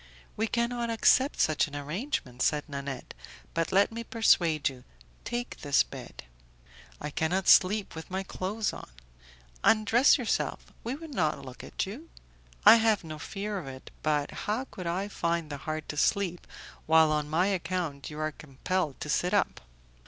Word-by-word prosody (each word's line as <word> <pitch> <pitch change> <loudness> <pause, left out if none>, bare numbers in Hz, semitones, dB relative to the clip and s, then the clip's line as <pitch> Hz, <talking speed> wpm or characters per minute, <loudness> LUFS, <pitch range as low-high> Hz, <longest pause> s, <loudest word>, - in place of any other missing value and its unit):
"We 220 +1 0
cannot 235 +1 -1
accept 260 +4 +3
such 155 -1 +3
an 145 - -9
arrangement," 145 - -4
said 150 0 +1
Nanette, 140 -3 -6 0.4
"but 165 0 -1
let 200 +3 +4
me 230 +1 -5
persuade 170 - +3
you; 130 -2 -5 0.4
take 240 +1 -4
this 140 -3 +3
bed." - - -10 0.8
"I 150 - -5
cannot 175 +5 0
sleep 200 +2 +5
with 160 0 -8
my 190 +1 -2
clothes 200 +3 -2
on." - - -9 0.7
"Undress 225 +5 +5
yourself; 245 -5 -2
we 240 +4 -3
will 325 +3 -9
not 155 - -1
look 130 -1 -10
at - - -3
you." 245 +13 -9 0.6
"I 220 +2 +10
have 220 -3 +2
no 155 -2 -7
fear 205 +2 -4
of 160 - -9
it, 130 0 -9
but 150 -1 0
how 220 +6 -2
could 180 -8 -8
I 185 +4 -1
find 170 -5 -2
the 145 - -4
heart 155 -1 -3
to 150 - -5
sleep, 180 0 +1 0.4
while 160 0 +6
on 150 -1 0
my 165 +4 +2
account 175 -6 -2
you 150 - -8
are 155 0 -1
compelled 150 +2 -3
to - - -4
sit - - +1
up?" - - +1
175 Hz, 165 wpm, -29 LUFS, 150-215 Hz, 0.8 s, I